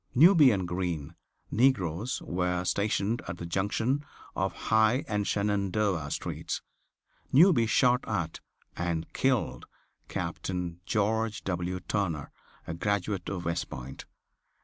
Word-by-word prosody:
Newby 160 0 +8
and 95 -6 0
Green, 85 -5 -3 0.4
negroes, 110 - +1
were 90 0 -1
stationed 105 +3 0
at - - -5
the 85 - -6
junction 105 - 0 0.3
of - - 0
High 110 +4 +2
and 105 -2 -1
Shenandoah 100 -5 0
streets. - - -4 0.7
Newby 140 -6 +6
shot 125 +2 +3
at 85 -6 -2 0.4
and 85 -1 -1
killed 115 - 0 0.4
Captain 90 -2 -3
George 110 0 0
W. 90 0 -2
Turner, 85 -8 -2 0.3
a - - -4
graduate 100 +1 -1
of 90 -3 -4
West 85 0 -1
Point. 65 +1 -8
100 Hz, 115 wpm, -29 LUFS, 85-110 Hz, 0.7 s, Newby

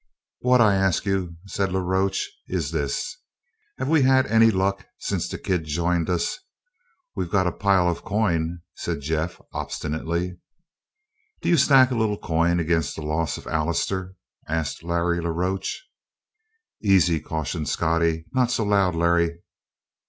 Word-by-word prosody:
"What 125 0 +4
I 105 -3 +5
ask 95 -1 +1
you," 95 -4 -1
said 95 0 -1
La 95 - 0
Roche, 95 +1 0 0.2
"is 85 -5 -2
this: 80 - -2 0.6
Have - - -2
we 160 0 +4
had 130 0 +4
any 115 +1 +5
luck 100 -1 0
since - - -2
the - - -4
kid 90 -4 -1
joined 85 +2 0
us?" 90 - -1 0.8
"We've 90 - -2
got 95 0 +2
a 90 - +1
pile 95 -2 +2
of 85 - +1
the - - -15
coin," 85 -5 0
said - - -4
Jeff 80 +4 -2
obstinately. 85 +3 -3 1.0
"D'you 175 - +4
stack 130 -3 +6
a - - 0
little 110 -2 +1
coin 85 0 +1
against 80 -3 0
the 80 - -6
loss 80 +1 -1
of - - -11
Allister?" 85 +4 -1 0.3
asked 80 -2 -2
Larry 85 0 0
la 85 - -2
Roche. 95 - -2 1.0
"Easy," 95 -5 +4
cautioned 80 +1 -3
Scottie. 80 -1 +1
"Not 125 -2 +2
so 115 - 0
loud, 100 -4 +2
Larry." 85 0 +1
90 Hz, 150 wpm, -24 LUFS, 85-100 Hz, 1.0 s, stack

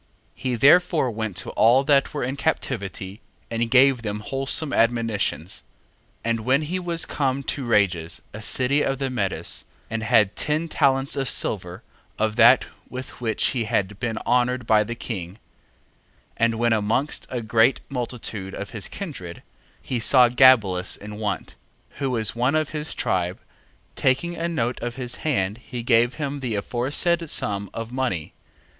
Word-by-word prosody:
1:15. - - -21
He 130 -2 -1
therefore 145 +1 +4
went 110 -3 -4
to - - -3
all 120 +5 +4
that 140 -1 +3
were 145 - -3
in 130 +2 -2
captivity, 105 -9 -3 0.3
and 115 0 -1
gave 130 0 +5
them 105 -1 -4
wholesome 135 +5 -1
admonitions. 115 -7 0 0.6
1:16. - - 0
And 115 - 0
when 130 +6 +2
he 175 +5 -3
was 170 -2 0
come 135 -1 -1
to 135 - -3
Rages 90 -8 +1
a 105 - -8
city 130 +6 +3
of 135 -1 0
the 135 -1 -3
Medes, 100 -7 -2 0.3
and 115 0 -2
had 110 -3 +3
ten 155 +3 0
talents 135 -3 +2
of 135 -2 0
silver 90 -3 +1 0.3
of 110 -1 0
that 120 +2 +6 0.2
with 130 -1 -8
which 110 -2 0
he 120 -4 -2
had 105 -3 -1
been 115 0 -2
honoured 125 0 +1
by 110 -1 +4
the 120 +3 -5
king: 95 -7 -6
1:17. - - -20 1.0
And 115 0 +2
when 115 0 +2
amongst 110 +7 0
a 125 -2 -3
great 115 +3 +3
multitude 115 -6 -5
of 100 - -6
his 105 -5 -3
kindred, 135 - -8 0.4
he 125 - -2
saw 125 +1 +5
Gabelus 115 -8 +4
in 105 0 -9
want, 105 -3 -3 0.5
who 135 -2 -1
was 115 -4 +1
one 125 +5 +1
of 155 -2 +1
his 150 0 -4
tribe, 90 0 -1 0.6
taking 155 +7 +1
a 165 +1 -2
note 125 -7 -2
of 120 0 -4
his 125 -2 -3
hand 105 -8 -1
he 120 0 -7
gave 120 +1 +3
him 145 -2 -4
the 125 -5 -3
aforesaid 145 - 0
sum 100 -6 -1
of 115 0 -6
money. 125 -12 -2
120 Hz, 165 wpm, -23 LUFS, 105-135 Hz, 1.0 s, that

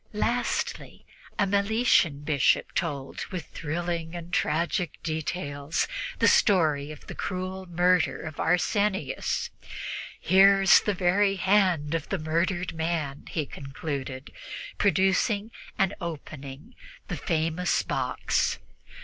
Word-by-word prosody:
Lastly, 235 +3 -2 0.3
a 200 - +3
Meletian 200 - +2
Bishop 145 -3 +2
told, 145 -6 -3
with 180 -4 -5
thrilling 170 +1 -4
and 175 0 -8
tragic 170 +2 0
details, 155 -2 -2 0.3
the - - +4
story 155 -7 +3
of 150 - -11
the - - -7
cruel 185 0 -4
murder 175 0 +2
of 155 -2 -7
Arsenius. 195 +3 0 0.7
"Here 195 +1 +6
is 195 - +7
the 210 - -1
very 195 +2 +3
hand 185 -6 +2
of 165 -2 -2
the 195 - 0
murdered 170 +3 -1
man," 160 -4 -2
he 155 -3 -2
concluded, 135 -1 -6 0.5
producing 200 +3 +2 0.3
and 195 +1 +2
opening 150 - -7 0.3
the - - -3
famous 165 +1 0
box. - - 0
175 Hz, 110 wpm, -27 LUFS, 155-190 Hz, 0.7 s, is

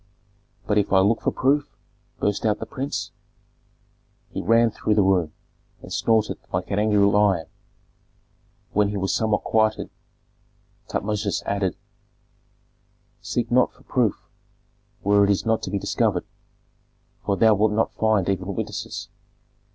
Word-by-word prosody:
"But 105 0 +2
if 100 - -1
I 95 - +5
look 110 +4 +2
for - - +1
proof?" 140 +2 0 0.4
burst 105 0 0
out 105 -1 +2
the - - -6
prince. 135 +1 -4 1.2
He - - -4
ran 115 +4 +4
through 105 0 0
the 105 - +4
room, 90 -5 +2 0.5
and - - -8
snorted 110 -2 +1
like - - -3
an 100 - +1
angry 105 0 +2
lion. 100 -4 +3 1.3
When 105 0 +3
he 105 - -3
was 95 0 -1
somewhat 110 -2 +1
quieted, 110 -1 +1 1.0
Tutmosis 105 -1 -2
added, 100 -3 -1 1.5
"Seek 120 -1 -2
not 125 +1 +3
for - - -22
proof 120 -6 -1 0.8
where 100 0 +4
it 100 - +2
is 100 +2 +1
not 110 0 +1
to - - -4
be 100 - -1
discovered, - - 0 1.0
for 100 - 0
thou 110 +1 +5
wilt 105 +1 +2
not 110 +1 0
find 110 -4 +1
even 95 0 -2
witnesses. 105 -2 -5
105 Hz, 140 wpm, -23 LUFS, 100-110 Hz, 1.5 s, I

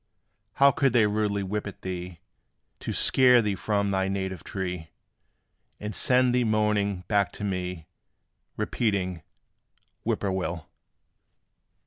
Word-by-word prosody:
How 140 0 +6
could 135 -1 +1
they 115 -3 +5
rudely 105 -1 0
whip 105 +2 -3
at 100 - -10
thee, 90 -2 -6 0.6
To - - -4
scare 125 -2 +5
thee 105 -3 0
from 100 +1 -1
thy 95 0 +1
native 95 -3 -3
tree, 90 -4 -5 0.9
And 105 +1 -5
send 125 +2 +3
thee 125 0 +3
moaning 105 -3 +1
back 100 -3 +2
to - - -7
me 90 -4 -3 0.7
Repeating, 95 -6 -1 0.8
"Whip - - -1
poor 100 - 0
will?" 90 -4 -3
100 Hz, 125 wpm, -26 LUFS, 95-110 Hz, 0.9 s, How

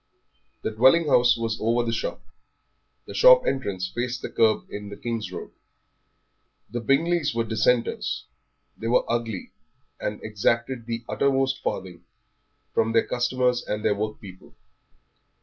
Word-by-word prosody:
The - - -1
dwelling 130 +10 +5
house 120 -2 +5
was 115 -1 -2
over 115 +2 +2
the 115 - -1
shop; - - -3 0.8
the - - -9
shop - - +7
entrance 100 -9 -1
faced 125 +4 -4
the - - -5
kerb 110 -1 +3
in 105 0 -6
the 100 - -8
King's 115 -1 -4
Road. - - -7 1.2
The 120 - -3
Bingleys 150 +3 +1
were 115 - +1
Dissenters. 115 +2 0 0.5
They 115 - -5
were 120 - +3
ugly, 115 -4 -3 0.5
and 105 - -3
exacted 115 +3 -1
the 115 0 -3
uttermost 135 -1 +1
farthing 90 -2 -4 0.7
from 115 0 +1
their 115 - +3
customers 125 0 0
and 105 0 -4
their 105 - +4
workpeople. 100 -3 -7
115 Hz, 135 wpm, -25 LUFS, 110-125 Hz, 1.2 s, shop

